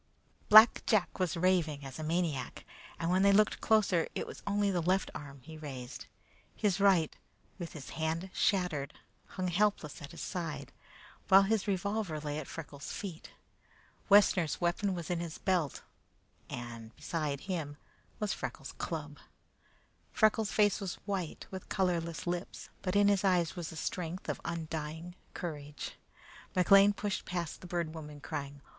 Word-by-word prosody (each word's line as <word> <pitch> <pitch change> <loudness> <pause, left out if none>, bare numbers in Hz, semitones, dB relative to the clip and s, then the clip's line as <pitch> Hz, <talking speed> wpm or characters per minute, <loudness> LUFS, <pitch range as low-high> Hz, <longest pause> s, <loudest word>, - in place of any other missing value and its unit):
Black 215 +2 +9
Jack 205 -4 +2
was 180 -2 0
raving 165 -5 +2
as 135 +2 -8
a - - -4
maniac, 160 -4 -1 0.3
and 165 +1 0
when 185 +1 +3
they 200 0 +6
looked 210 +2 +4
closer 205 -6 +3
it - - -2
was - - -9
only 200 0 +2
the 180 -2 +1
left 185 +3 +1
arm 140 -2 -9
that - - -24
he 160 -1 -9
raised. 135 -3 -7 0.5
His 200 -3 +1
right, 190 -6 +4 0.4
with 170 -2 -6
the 145 -4 -8
hand 165 +4 -2
shattered, 175 -8 +1 0.3
hung 185 -1 -3
helpless 180 -4 0
at 145 - -8
his 170 - -9
side, 155 -7 -4 0.6
while 195 +1 +8
his 215 +1 +1
revolver 200 -3 -1
lay 150 0 -3
at 150 - -7
Freckles' 145 -3 -7
feet. 180 -6 -6 0.8
Wessner's 185 -6 +5
weapon 180 +3 +1
was 170 -1 -4
in 175 - 0
his 170 -2 -5
belt, 175 -7 0 0.7
and 115 -2 -7
beside 150 -4 -2
him 160 -7 -4 0.5
Freckles' - - -4
club. - - -4 0.9
Freckles' 215 -1 +3
face 205 -1 +3
was 190 -2 -3
white, 190 -6 -3
with 190 -1 -7
colorless 170 -4 0
lips, 175 +1 -4
but 185 0 -2
in 205 0 +6
his 200 -1 +3
eyes 180 -4 +2
was 175 -3 -4
the - - -9
strength 175 +2 -4
of - - -2
undying 160 +1 -4 0.2
courage. 150 -5 -5 0.6
McLean 195 +2 +7
pushed 205 -1 -3
past 175 -3 -4
the 180 - -9
Bird 170 -2 -2
Woman 150 -2 -8
crying. 145 -1 -5
175 Hz, 155 wpm, -32 LUFS, 155-195 Hz, 0.9 s, Black